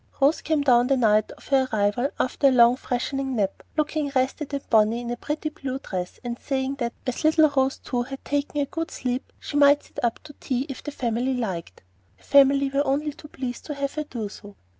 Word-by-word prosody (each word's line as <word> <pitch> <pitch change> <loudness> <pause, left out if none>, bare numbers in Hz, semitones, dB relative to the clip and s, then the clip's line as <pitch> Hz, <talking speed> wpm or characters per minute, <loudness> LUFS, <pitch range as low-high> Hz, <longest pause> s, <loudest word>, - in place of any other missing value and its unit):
Rose 285 +3 +3
came 310 -1 +1
down 245 -3 +5
the 275 0 +3
night 215 -3 +3
of - - -17
her 265 -2 +3
arrival 215 +5 +1
after 255 +2 +2
a - - +5
long, 240 -1 +6
freshening 265 +1 -2
nap, 200 -3 -1 0.2
looking 305 -1 0
rested 270 +3 0
and 280 -1 -4
bonny 220 +1 +3
in 240 0 -4
a - - -1
pretty 300 +5 -3
blue 270 -3 -5
dress, 180 -8 -5
and 240 -1 -4
saying 270 -1 -1
that 235 -2 -2
as 255 +3 -3
little 315 0 +5
Rose 270 -1 +1
too 245 -2 -2
had 270 +2 -7
taken 290 0 -1
a - - +1
good 325 +3 -4
sleep, 250 0 -3
she 290 - -4
might 285 0 +6
sit - - -10
up 235 -1 +1
to 300 -1 -12
tea 255 -2 -1
if 270 - -6
the - - -6
family 250 -1 -1
liked. 185 - -4 0.3
The - - -26
family 275 0 +5
were 280 +1 +2
only 290 +2 0
too 300 - -13
pleased 255 -4 -6
to 295 - -4
have 280 0 -2
her 305 - -2
do 235 -7 -5
so. 205 0 -12
265 Hz, 225 wpm, -25 LUFS, 240-285 Hz, 0.3 s, long